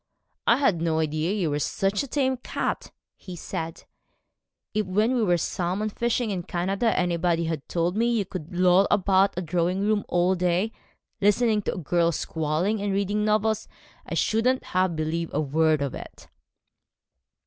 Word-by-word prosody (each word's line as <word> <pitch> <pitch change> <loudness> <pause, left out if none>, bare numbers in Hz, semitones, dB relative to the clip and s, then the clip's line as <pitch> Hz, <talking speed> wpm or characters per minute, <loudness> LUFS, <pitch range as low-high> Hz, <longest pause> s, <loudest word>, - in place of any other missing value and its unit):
'I - - +6
had 215 - +2
no 165 -1 +1
idea 155 +2 0
you 190 -7 0
were 145 - 0
such 195 +6 0
a 280 - -5
tame 265 -1 +1
cat,' 250 - -3 0.3
he 185 -2 -9
said: 165 -1 -5 0.9
'if 215 - +1
when 210 +6 +2
we 250 - +1
were 175 -5 +3
salmon 185 +5 -2
fishing 235 +1 -1
in 185 -3 -2
Canada 195 +6 -1
anybody 170 -1 +1
had 160 -3 -4
told 175 +1 0
me 235 +2 +2
you 220 -4 +1
could 175 -2 -7
loll 180 +2 +4
about 195 -1 +3
a 180 - -1
drawing 175 +3 0
room 210 0 +1
all 175 +1 +2
day 180 +4 0 0.5
listening 210 +1 +3
to - - -3
a - - -7
girl 170 0 +1
squalling 160 +7 -1
and 205 0 -1
reading 200 +2 0
novels, 215 0 +1 0.4
I - - -5
shouldn't 250 +4 +1
have 185 -2 +2
believed 160 +1 -2
a - - +2
word 155 0 +2
of 140 - -3
it.' - - -10
185 Hz, 170 wpm, -25 LUFS, 170-210 Hz, 0.9 s, I